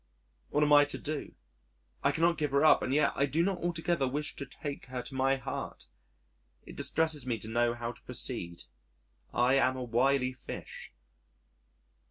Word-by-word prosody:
What 150 - +2
am 150 0 +4
I 145 0 +9
to 145 - -5
do? 150 -1 -5 0.7
I - - +4
cannot 170 +1 +2
give 150 -1 0
her 140 +2 +4
up 155 - +6
and - - -2
yet 145 +1 +3
I 140 - +1
do 155 +5 +1
not 190 -1 0
altogether 170 -4 0
wish 145 +3 -3
to 140 - -5
take 140 +1 -7
her 125 -1 -5
to - - -10
my 135 +1 +2
heart. 135 0 -6 0.8
It - - -11
distresses 160 -5 0
me 120 -2 0
to 110 - -7
know 120 +1 +1
how 120 0 -4
to - - -17
proceed. 85 0 -4 0.7
I 125 +2 +3
am 130 -1 +3
a 130 - -3
wily 125 +2 +2
fish. 125 - -9
135 Hz, 180 wpm, -31 LUFS, 125-150 Hz, 0.8 s, I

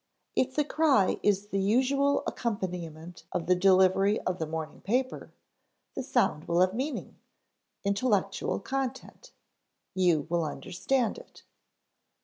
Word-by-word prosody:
If 260 0 +1
the 300 - +2
cry 290 -10 +2
is 205 0 +1
the 195 - -1
usual 265 +7 +2
accompaniment 175 -6 -4
of 170 - -2
the 180 - +4
delivery 190 +2 +4
of 185 0 -2
the 160 - -2
morning 160 0 -5
paper, 255 +6 -2 0.6
the - - -3
sound 245 - 0
will 170 +1 +2
have 185 0 +3
meaning, 270 +6 -4 0.6
intellectual 200 -1 0
content; 265 - -5 0.6
you 175 -6 +2
will 170 0 0
understand 190 - -1
it. - - -17
195 Hz, 125 wpm, -29 LUFS, 180-255 Hz, 0.6 s, the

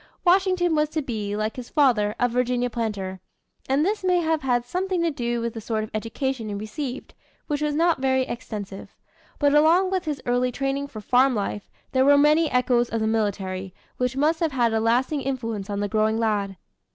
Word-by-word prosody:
Washington 365 -1 +3
was 300 -1 +2
to 310 -1 -2
be, 210 -5 -3
like 215 +2 -2
his 250 -1 -7
father, 230 -8 +2
a 245 - +3
Virginia 245 0 0
planter; 200 -5 -3 0.5
and 280 +4 +2
this 415 +1 -1
may 365 -1 +3
have 320 -2 0
had 245 -3 0
something 365 +5 -1
to 335 - +1
do 240 -4 -2
with 235 -1 -3
the 225 - -6
sort 220 0 -2
of 215 - -8
education 225 +2 -3
he 205 - -3
received, 245 +6 -6 0.3
which 295 -1 -2
was 300 -1 0
not 330 -3 +2
very 260 -1 +2
extensive. 210 -5 -7 0.4
But 285 -1 +3
along 335 +5 +4
with 375 -2 -1
his 295 -3 -2
early 245 +1 +1
training 275 +2 -2
for 215 -6 -9
farm 255 +3 +3
life 205 0 -3 0.2
there 260 0 +3
were 285 +1 +6
many 300 +2 +4
echoes 245 -1 +2
of 230 - -1
the 220 - 0
military, 195 -4 -2 0.2
which 250 +1 -1
must 310 +3 +2
have 325 -4 0
had 240 -3 +2
a 220 - +2
lasting 250 +6 +1
influence 230 -7 -3
on 200 0 -2
the 205 - 0
growing 215 +2 +1
lad. 205 -4 -1
250 Hz, 200 wpm, -24 LUFS, 220-295 Hz, 0.5 s, were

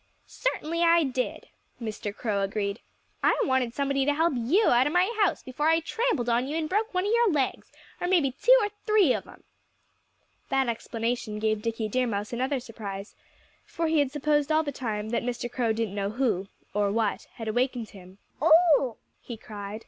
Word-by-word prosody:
"Certainly 335 -9 -2
I 335 0 +5
did," 255 -2 -3 0.3
Mr. 215 -2 -4
Crow 205 -1 -2
agreed. 200 +1 -2 0.4
"I - - +3
wanted 260 -3 0
somebody 275 -1 +1
to 290 +1 +1
help 325 +1 +2
you 285 - +2
out 245 +3 +4
of 295 - -2
my 370 +6 +2
house, 390 - 0
before 295 +5 -1
I 325 0 +4
trampled 330 - -1
on 240 +2 +1
you 300 +3 -2
and 320 -1 -1
broke 425 +6 0
one 365 0 0
of 415 - 0
your 470 -1 +4
legs 275 -5 -1 0.3
or 355 - -2
maybe 340 -8 +3
two - - +5
or 415 - 0 0.2
three 415 -11 +5
of - - -4
'em." - - -15 1.1
That 270 -1 +1
explanation 230 -1 -3
gave 215 0 0
Dickie 225 0 -2
Deer 255 +3 0
Mouse 205 0 -3
another 260 +3 -1
surprise; 210 -4 -7 0.5
for 335 - -3
he 320 -1 +2
had 285 -2 +2
supposed 295 0 +1
all 310 +1 +3
the 290 - -3
time 220 -5 -4
that 235 - 0
Mr. 240 0 -4
Crow 240 -3 0
didn't 220 -2 -2
know 200 -1 -2
who 215 -5 0 0.3
or 205 -1 +1
what 220 -1 -1
had 225 - -7
awakened 245 0 -1
him. 185 -1 -14 0.2
"Oh!" 315 -6 +5 0.2
he 235 - -8
cried. 210 -1 -7
250 Hz, 190 wpm, -27 LUFS, 220-310 Hz, 1.1 s, I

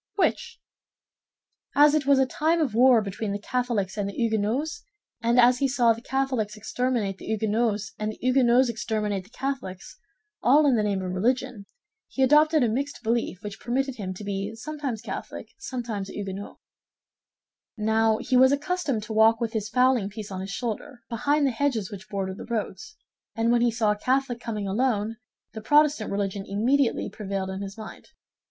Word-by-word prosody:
"Which?" 470 +3 0 1.2
"As 295 +1 +6
it 300 -3 +1
was 280 -1 +6
a 265 - +4
time 315 +6 +1
of 285 -8 0
war 240 -1 +5
between 200 +1 -4
the - - -1
Catholics 220 -4 -2
and 200 -1 -1
the - - -7
Huguenots, 230 - -1 0.4
and 235 +2 +3
as 245 +1 +5
he 275 - +2
saw 245 -3 +3
the 225 - -10
Catholics 255 -5 -1
exterminate 220 -2 -2
the - - -10
Huguenots 215 0 0
and 215 0 -1
the - - -12
Huguenots 255 0 +4
exterminate 210 -4 -2
the - - -19
Catholics—all 270 - -2
in 270 -4 +4
the 220 - +2
name 200 -2 -1
of 185 - -3
religion—he 250 - -3
adopted 300 +2 +5
a - - +3
mixed 270 +4 -3
belief 225 -4 -1
which 210 0 -7
permitted 265 +2 -2
him 190 -3 -4
to 210 - -9
be 200 +2 -3
sometimes 265 -3 -5
Catholic, - - -6
sometimes 230 - -4
a - - -9
Huguenot. 200 0 -6 1.2
Now, 220 0 +2
he 255 - -1
was 260 +1 +6
accustomed 285 - -1
to 220 - -6
walk 220 +1 +5
with 230 -2 -2
his 215 -2 -2
fowling 250 -4 +3
piece 210 0 -8
on 185 -1 -4
his 190 - -6
shoulder, 240 +4 -5
behind 285 +5 +1
the 270 - +2
hedges 235 -5 -1
which 200 +1 -9
border 195 -2 -3
the - - -9
roads, 240 - -4 0.4
and 225 +1 +1
when 240 0 +3
he 240 - +4
saw 225 -2 +1
a - - 0
Catholic 260 -1 0
coming 215 -4 -4
alone, 220 0 0 0.4
the 220 - -7
Protestant 295 -2 +3
religion 200 0 -2
immediately 240 +6 +1
prevailed 195 -2 -4
in 190 +1 -5
his 200 +1 -7
mind. 220 0 -10
230 Hz, 175 wpm, -26 LUFS, 210-265 Hz, 1.2 s, As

